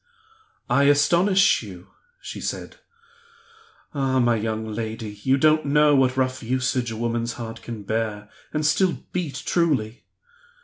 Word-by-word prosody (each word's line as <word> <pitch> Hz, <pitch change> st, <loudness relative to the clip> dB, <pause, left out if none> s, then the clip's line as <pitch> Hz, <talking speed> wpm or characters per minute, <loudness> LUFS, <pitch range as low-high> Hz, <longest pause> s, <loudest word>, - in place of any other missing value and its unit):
"I 140 Hz, -, +3 dB
astonish 170 Hz, +7 st, +4 dB
you?" 95 Hz, -4 st, -11 dB, 0.3 s
she -, -, -8 dB
said. -, -, -5 dB, 1.2 s
"Ah, 135 Hz, -2 st, 0 dB
my 120 Hz, -1 st, +3 dB
young 110 Hz, 0 st, -2 dB
lady, 110 Hz, 0 st, -5 dB
you 130 Hz, +3 st, +2 dB
don't 155 Hz, +2 st, +3 dB
know 150 Hz, +1 st, +4 dB
what 130 Hz, -1 st, +2 dB
rough 130 Hz, 0 st, 0 dB
usage 125 Hz, 0 st, -1 dB
a 115 Hz, -, -5 dB
woman's 115 Hz, 0 st, -2 dB
heart 115 Hz, -2 st, -7 dB
can 115 Hz, -3 st, -7 dB
bear, 105 Hz, 0 st, -3 dB, 0.2 s
and 150 Hz, 0 st, -1 dB
still 175 Hz, +4 st, +1 dB
beat 150 Hz, -7 st, -3 dB
truly! 135 Hz, -10 st, 0 dB
130 Hz, 135 wpm, -23 LUFS, 115-145 Hz, 1.2 s, astonish